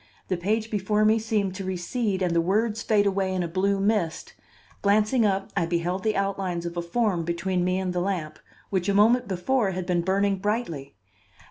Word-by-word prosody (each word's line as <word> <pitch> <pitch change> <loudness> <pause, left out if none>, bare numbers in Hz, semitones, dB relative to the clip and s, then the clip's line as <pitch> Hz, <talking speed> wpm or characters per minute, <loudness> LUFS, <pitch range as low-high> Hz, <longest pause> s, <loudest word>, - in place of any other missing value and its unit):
the 185 - +1
page 215 +5 -1
before 210 +1 +1
me 220 +1 +4
seemed 215 -4 -1
to 195 +1 -6
recede 190 +2 -2
and 175 -2 0
the 170 - +4
words 215 +5 0
fade 210 -3 +2
away 195 -1 0
in 185 -1 -1
a - - -2
blue 195 +3 0
mist; 195 -5 -1 0.5
glancing 215 +3 +3
up 195 -1 -1
I 170 -4 +1
beheld 175 +2 -1
the 215 +2 0
outlines 195 -3 -2
of 170 0 -5
a 175 - -1
form 180 0 0
between 175 +2 -1
me 185 +1 +1
and 185 -1 -2
the 180 - 0
lamp, 175 -5 -3 0.3
which 190 -1 0
a 200 - +2
moment 225 +4 +4
before 195 +3 0
had 185 0 -3
been 175 -1 +1
burning 195 +2 +1
brightly. 185 - -3
195 Hz, 200 wpm, -25 LUFS, 180-210 Hz, 0.5 s, me